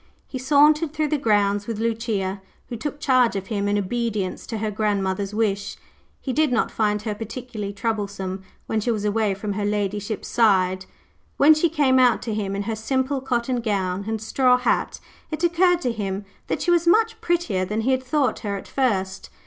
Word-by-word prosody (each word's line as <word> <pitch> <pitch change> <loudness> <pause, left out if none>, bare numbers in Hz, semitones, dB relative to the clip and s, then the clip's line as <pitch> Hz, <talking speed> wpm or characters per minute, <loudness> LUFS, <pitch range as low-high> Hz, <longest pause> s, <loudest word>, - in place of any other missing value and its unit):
He 260 - -6
sauntered 300 +3 +4
through 305 -1 0
the 300 - 0
grounds 205 -4 +1
with 230 -2 -3
Lucia, 220 -4 -2 0.3
who 240 - -4
took 290 +6 -5
charge 255 -6 +3
of 195 -1 -3
him 200 -1 0
in 205 0 +1
obedience 210 -1 -2
to 225 - -4
her 215 0 -2
grandmother's 200 -2 -1
wish. 210 -2 -1 0.4
He 260 - -4
did 305 -1 +2
not 240 - +1
find 210 -1 0
her 215 -2 -2
particularly 220 -1 -6
troublesome 200 -3 -3 0.2
when 220 - -1
she 240 - -2
was 215 -3 -1
away 210 -1 +1
from 205 +1 -4
her 205 +1 -3
ladyship's 205 +1 -2
side. 190 -4 +2 0.5
When 300 +3 +7
she 310 +2 +2
came 280 -4 +3
out 250 -3 +4
to 225 - -3
him 200 -2 -2
in 200 - -2
her 225 +2 -3
simple 260 +4 -1
cotton 245 -1 -1
gown 195 -3 -1
and 220 0 -2
straw 250 +3 +3
hat, 250 - 0 0.3
it 310 +2 -4
occurred 345 +1 +3
to 250 - 0
him 200 -2 -4 0.2
that - - -2
she 350 - +2
was 340 -1 +2
much 445 +4 +3
prettier 340 - 0
than 210 +4 -2
he 255 +4 +1
had 260 0 +1
thought 260 -2 0
her 200 -2 -3
at - - -10
first. 190 -8 -1
220 Hz, 195 wpm, -23 LUFS, 200-260 Hz, 0.5 s, When